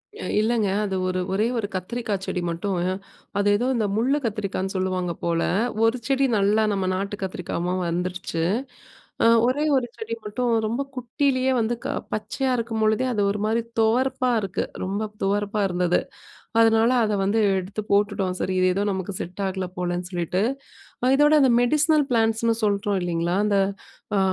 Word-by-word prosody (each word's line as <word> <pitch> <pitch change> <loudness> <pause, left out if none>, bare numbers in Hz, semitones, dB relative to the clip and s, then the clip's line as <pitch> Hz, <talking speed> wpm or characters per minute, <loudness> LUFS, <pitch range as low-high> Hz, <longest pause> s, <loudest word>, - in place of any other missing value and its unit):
இ 445 - -11 0.2
இல்லங்க. 220 -1 +1 0.2
அது 195 -2 -2
ஒரு 185 0 -1
ஒரே 215 +4 +2
ஒரு 210 - -1
கத்திரிக்காச்செடி 195 -1 -3
மட்டும். 185 +4 -2 0.6
அது 205 0 +2
ஏதோ 245 - -1
இந்த 220 -3 +1
முள்ளு 255 +6 +2
கத்திரிக்கான்னு 200 -3 -2
சொல்லுவாங்க 185 -2 -1
போல. 170 -1 +1 0.4
ஒரு 230 +3 +2
செடி 270 0 +2
நல்லா 205 +2 +3
நம்ம 195 -1 -1
நாட்டு 200 +2 -2
கத்திரிக்காவா 180 -1 -3
வந்துருச்சு. 180 -1 -2 0.8
அ - - +5 0.2
ஒரே 285 +4 +1
ஒரு 250 -2 +1
செடி 225 +1 -4
மட்டும் 235 +4 -1
ரொம்ப 235 +5 -1
குட்டிலேயே 255 +1 0
வந்து, 230 +2 0
க - - 0 0.3
பச்சையா 220 +5 -1
இருக்கும்பொழுதே 225 +1 +1
அது 210 - 0
ஒரு 205 - -3
மாதிரி 225 +2 +1 0.2
துவர்ப்பாருக்கு. 240 -3 +1 0.2
ரொம்ப 195 +3 -2 0.2
துவர்ப்பா 205 +1 0
இருந்தது. 180 -1 +1 0.6
அதனால 225 +1 +5
அத 215 - 0
வந்து 215 +3 +2 0.2
எடுத்து 200 +3 -4
போட்டுட்டோம். 200 -2 +1
சரி, 185 0 -1
இது 185 - +4
ஏதோ 200 - 0
நமக்கு 190 +1 -4
செட் 180 +3 -5
ஆகல 190 -1 -3
போலன்னு 180 0 -2
சொல்லிட்டு. 175 +1 -1 0.6
அ - - +3
இதோட 295 +2 +5
அந்த 265 -2 +5
மெடிசினல் 305 +4 +3
பிளான்ட்ஸ்னு 225 0 +2
சொல்றோம் 200 -1 +1
இல்லைங்களா, 175 +1 -1
அந்த 200 -1 +2 0.6
அ - - +3
205 Hz, 155 wpm, -24 LUFS, 185-230 Hz, 0.8 s, அ